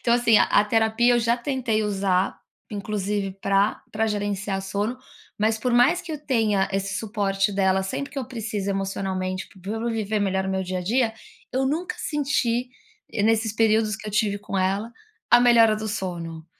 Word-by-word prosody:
Então 235 - +3
assim, 230 -3 +5
a - - +5
a 205 - +3
terapia 225 +3 +3
eu - - +3
já 235 0 +2
tentei 245 -4 -1
usar, 195 -3 0 0.3
inclusive 205 -1 -2
pra 200 +2 +1
pra 220 +1 0
gerenciar 205 -2 -2
sono, 205 +5 -2 0.4
mas 220 +1 +1
por 250 +2 -1
mais 250 +9 +4
que 330 - -7
eu 305 - -4
tenha 215 -7 +2
esse 195 0 -2
suporte 200 -2 0
dela 190 -1 +2
sempre 235 +9 -4
que 280 - -4
eu 265 - -3
preciso 220 -5 -4
emocionalmente 190 -1 -3
para 195 +2 -8
eu 225 +1 -2
viver 215 -1 -1
melhor 190 -1 0
no 190 - -2
meu 190 0 -1
dia 185 0 -3
a - - -3
dia, 225 +5 +1 0.4
eu 265 +1 +1
nunca 320 +6 -2
senti, 260 -5 0 0.4
e 225 - -3
nesses 220 +1 +2
períodos 220 -1 +2
que - - -10
eu 210 - -5
tive 205 -1 +1
com 200 -1 -5
ela, 195 +5 0 0.4
a 240 - +7
melhora 230 -3 +6
do 215 0 -4
sono. 170 -6 -5
210 Hz, 190 wpm, -24 LUFS, 195-230 Hz, 0.4 s, a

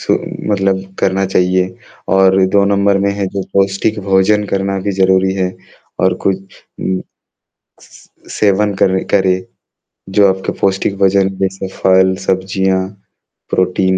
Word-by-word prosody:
सु - - +1 0.4
मतलब 95 -1 +1 0.2
करना 95 +1 +1
चाहिए 90 0 +1 0.5
और 95 0 +4 0.2
2 100 - +5
नंबर 100 0 +2
में - - +2
है 100 - 0
जो 95 - -1
पौष्टिक 100 +2 +1
भोजन 95 +2 +3
करना 95 0 -1
भी 100 - 0
ज़रूरी 95 0 +3
है 95 -1 -1 0.5
और 95 -1 +3
कुछ 95 0 -3 0.2
हुँ। 95 0 -1 1.3
स - - -10
सेवन 105 0 +1
कर 95 - +4 0.2
करे, 95 -2 +3 0.8
जो 100 -1 +6
आपके 95 0 -1
पौष्टिक 95 0 0
भोजन 95 0 +3
जैसे 95 0 -2
फल, 95 0 +3
सब्ज़ियाँ, 95 0 0 0.7
प्रोटीन, 95 0 +1
95 Hz, 135 wpm, -15 LUFS, 95-100 Hz, 1.3 s, जो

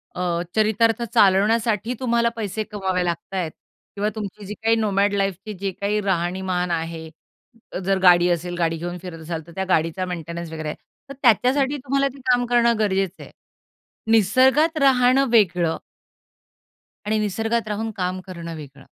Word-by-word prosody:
अ, 175 -1 -1
चरितार्थ 220 +1 +2
चालवण्यासाठी 220 +2 +3
तुम्हाला 235 -2 +1
पैसे 215 -1 -3
कमवावे 190 -4 -2
लागता 170 +2 -4
आहेत 170 -4 -2 0.4
किंवा 205 +1 0
तुमची 210 -1 -6
जी 205 - -6
काही 225 0 +4
नोमॅड 205 -2 +1
लाईफची 195 +1 -2
जी 195 0 -3
काही 205 +1 0
राहणीमान 180 -1 -1
आहे. 165 -1 -4 0.8
जर 195 0 +2
गाडी 175 -1 +6
असेल 175 +1 -1
गाडी 165 -1 0
घेऊन 175 +2 -5
फिरत 175 -3 -8
असाल 165 0 -4
तर - - -12
त्या 190 - -2
गाडीचा 165 +2 +1
मेंटेनन्स 170 -1 -6
वगैरे. 155 -1 -4 0.4
तर - - -6
त्याच्यासाठी 265 +4 +3
तुम्हाला 275 +1 0
ते - - -13
काम 245 0 +2
करणं 235 -1 +3
गरजेचं 195 -3 -1
आहे. - - -13 0.8
"निसर्गात 260 - +4
राहणं 260 0 +4
वेगळं" 180 -7 +3 1.3
"आणि 215 +1 +1
निसर्गात 225 +3 -1
राहून 215 +1 -3
काम 185 0 -2
करणं 170 -2 -7
वेगळं." 140 -3 -11
195 Hz, 150 wpm, -22 LUFS, 175-225 Hz, 1.3 s, गाडी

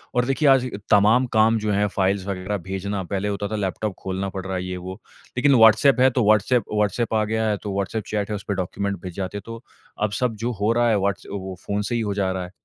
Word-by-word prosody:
और 125 0 +2
देखिए, 135 +3 +1
आज 130 -2 +4 0.2
तमाम 110 +5 +5
काम 110 +1 +4
जो 105 0 -1
हैं, 105 +1 +2
फ़ाइल्स 95 -1 0
वगैरह 100 +1 -3
भेजना, 95 +1 -3
पहले 100 +2 -3
होता 100 0 -2
था, - - -1
लैपटॉप 100 0 -2
खोलना 95 +1 -3
पड़ 95 -1 -6
रहा 95 0 -3
है, 90 - -3
ये 90 0 -4
वो। 90 +1 -7 0.4
लेकिन 140 +2 +4
व्हॉट्सएप 115 +4 +6
है, 130 - +6
तो 125 -1 +1
व्हॉट्सएप 110 +3 +3
व्हॉट्सएप 105 +3 0
आ 110 -1 +2
गया 110 +1 -1
है, 105 - 0
तो 105 - -3
व्हॉट्सएप 100 +2 -2
चैट 105 -1 -2
है, 105 - -2
उसपे 100 0 -4
डॉक्यूमेंट 100 +2 -3
भिज 90 -2 -7
जाते 95 +1 -4
हैं। - - -6
तो 115 +1 -8 0.4
अब 105 - +1
सब 125 -3 0
जो 120 - 0
हो 105 +2 +3
रहा 120 0 +2
है, 110 - +3
व्हॉट्स 100 -1 -1
वो 95 -1 -5
फ़ोन 100 0 -1
से 120 - -1
ही 120 - 0
हो 105 -2 -1
जा 100 -2 0
रहा 95 -1 -3
है। 90 - -12
105 Hz, 255 wpm, -23 LUFS, 95-110 Hz, 0.4 s, व्हॉट्सएप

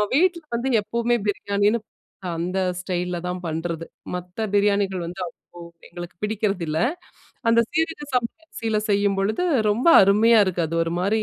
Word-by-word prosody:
வீட்டுக்கு 340 -1 +2
வந்து 260 +2 -1
எப்பவுமே 235 +3 0
பிரியாணின்னு, 205 +2 +1 0.6
அந்த 180 +3 -2 0.2
ஸ்டைல் 180 -1 -2
அ - - -9
தான் 180 0 -5
பண்றது. 165 +1 -3 0.3
மத்த 180 +5 -4
பிரியாணிகள் 200 -3 +2
வந்து 180 +2 -8
அவ்ளோ 170 +1 -15 0.3
எங்களுக்கு 175 0 -8
பிடிக்குறதில்ல. 195 -7 -1 0.7
அந்த 230 0 +5
சீரக 325 0 -1
சம்ப 240 -2 +1
அரிசியில 225 -8 -2
செய்யும்பொழுது, 200 - +1 0.3
ரொம்ப 235 +10 +2
அருமையா 215 +3 +5
இருக்கு. 180 -2 -1
அது 165 - -3
ஒருமாரி, 185 +6 0
200 Hz, 135 wpm, -23 LUFS, 180-230 Hz, 0.7 s, அந்த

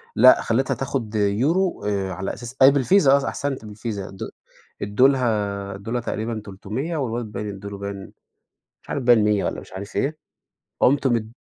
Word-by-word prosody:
لأ، 130 +3 +7
خليتها 130 +4 +1
تاخد 125 -5 -3
يورو 130 - +1
آآ 100 -2 -1
على 95 +2 -4
أساس 120 +2 -8
أيوة 135 +1 +8
بالفيزا 140 +2 +4
آه، 140 -1 0
أحسنت 135 -5 -3
بالفيزا، 105 -2 -5
ادو 95 - -7 0.5
ادولها 105 -4 +1
ادولها 115 +5 -3
تقريبًا 110 0 -3
300، 110 - -4
والواد 120 -4 -2
باين 105 -1 -5
ادوله 100 +1 -8
باين 100 -1 -7 0.7
مش - - -23
عارف 140 - -2
باين 120 -3 +5
100 105 -1 +2
والّا، - - -3
مش - - -15
عارف 100 +3 -8
إيه. 150 +3 0 0.6
قمت 140 +1 +4
مد 115 -3 -1
115 Hz, 160 wpm, -23 LUFS, 100-130 Hz, 0.7 s, أيوة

